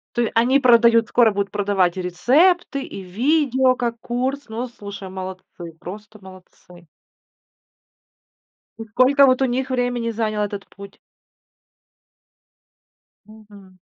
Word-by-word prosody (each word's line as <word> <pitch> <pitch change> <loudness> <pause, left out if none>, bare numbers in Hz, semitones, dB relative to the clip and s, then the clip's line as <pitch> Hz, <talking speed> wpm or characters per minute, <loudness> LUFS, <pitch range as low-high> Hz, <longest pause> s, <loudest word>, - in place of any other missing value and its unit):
То 240 - +1
е 235 - -1
они 245 +4 +3
продают, 235 -3 +4
скоро 235 -3 +3
будут 200 0 -3
продавать 195 -3 0
и - - -2
рецепты, 275 - +1
и 195 - -9
видео 260 - +1
как 235 -2 -3
курс. 260 +5 -3
Ну, 235 +3 -4
слушай, 200 -4 -10
молодцы, 185 -2 -9
просто 210 +4 -11
молодцы. 180 -2 -17 1.9
И - - -5
сколько 255 +6 +4
вот 255 0 +2
у - - +4
них 260 +1 -2
времени 245 -2 -1
занял 215 -1 -2
этот 205 -1 -5
путь? 200 0 -14 2.3
Мгм. 205 -3 -17
225 Hz, 120 wpm, -21 LUFS, 195-255 Hz, 2.3 s, продают